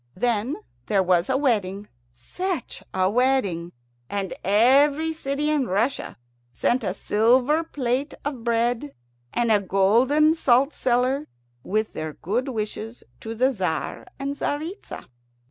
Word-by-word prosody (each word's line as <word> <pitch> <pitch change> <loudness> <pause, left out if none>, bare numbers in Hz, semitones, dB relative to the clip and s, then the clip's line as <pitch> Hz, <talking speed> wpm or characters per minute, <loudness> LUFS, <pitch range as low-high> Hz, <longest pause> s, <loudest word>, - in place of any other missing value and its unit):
Then 235 +5 0 0.3
there 195 -2 +3
was 180 +1 +2
a 260 - +2
wedding 205 -7 0 0.3
such 355 - -4
a 185 0 +1
wedding! 205 -7 +1 0.4
and 200 -2 -3
every 280 - +4
city 295 0 -1
in 285 -5 +1
Russia 225 +9 -1 0.4
sent 240 - +1
a - - -2
silver 250 +9 +3
plate 270 -2 -2
of 270 -5 -4
bread, 230 - 0 0.4
and 235 -1 +1
a 210 -2 +4
golden 235 - +3
salt 275 -2 +3
cellar, 255 +4 +1 0.4
with 215 +2 -1
their 155 -1 -5
good 230 - -2
wishes 220 -1 -5 0.2
to 225 +1 -6
the 255 +4 +3
Tzar 185 -7 -3
and 275 +1 -3
Tzaritza. 310 +7 -5
240 Hz, 130 wpm, -24 LUFS, 205-275 Hz, 0.4 s, every